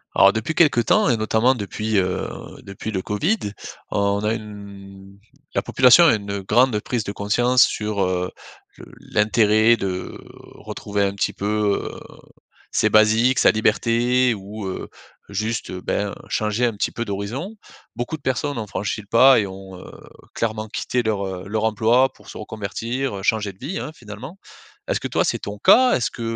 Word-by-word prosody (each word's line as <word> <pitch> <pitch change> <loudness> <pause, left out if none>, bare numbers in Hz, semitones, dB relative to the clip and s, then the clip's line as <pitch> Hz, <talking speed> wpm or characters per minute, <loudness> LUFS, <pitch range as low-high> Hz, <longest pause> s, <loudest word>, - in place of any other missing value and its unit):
Alors, 100 - +7
depuis 110 +9 -3
quelques 145 -8 +3
temps 215 - +3
et 120 - +2
notamment 110 +4 +2
depuis, 105 -1 -3
heu, 90 -1 0 0.4
depuis 100 +3 -7
le 95 -3 -2
Covid, 150 - 0 0.5
on 100 0 0
a 105 +1 +1
une 100 -2 -10 0.3
la - - +1
population 130 +7 +6
a 155 - +5
une 100 -1 -4
grande 115 +3 +2
prise 115 +1 -3
de 100 - -5
conscience 120 +5 +3
sur, 105 -2 -1
heu, 90 -1 -1 0.5
le - - -12 0.3
l'intérêt 110 +1 +4
de 95 -4 -4 0.4
retrouver 100 0 -3
un 100 0 0
petit 100 - -1
peu, 105 0 -1
heu, - - -10 0.7
ses 110 - +2
basiques, 110 +5 +4
sa - - +6
liberté 120 +3 +2
ou, 105 +1 -8
heu, 95 - -5 0.4
juste, 110 +3 -3
ben, 100 +2 -2 0.2
changer 110 +3 0
un 120 - 0
petit 100 - -2
peu 115 - -4
d'horizon. 115 - -5 0.4
Beaucoup 120 +6 -3
de - - -29
personnes 140 +1 -2
ont 110 -2 -4
franchi 100 +3 -3
le 100 - -20
pas 130 +5 +6
et 100 - -1
ont, 95 0 -10
heu, - - -12 0.4
clairement 110 -1 -2
quitté 125 +3 -2
leur, 105 -3 -1
heu, 95 -1 -6
leur 110 +1 -2
emploi 115 +4 +3
pour - - -18
se - - -9
reconvertir, 110 +2 -4
changer 105 -1 0
de - - -27
vie, 155 +9 -4
hein, 150 - -6
finalement. 120 - -10 0.5
Est-ce - - -1
que - - -3
toi, - - +1
c'est - - -1
ton 100 +1 -6
cas? 255 - +5
Est-ce 120 - -1
que, - - -9
110 Hz, 175 wpm, -22 LUFS, 100-120 Hz, 0.7 s, Alors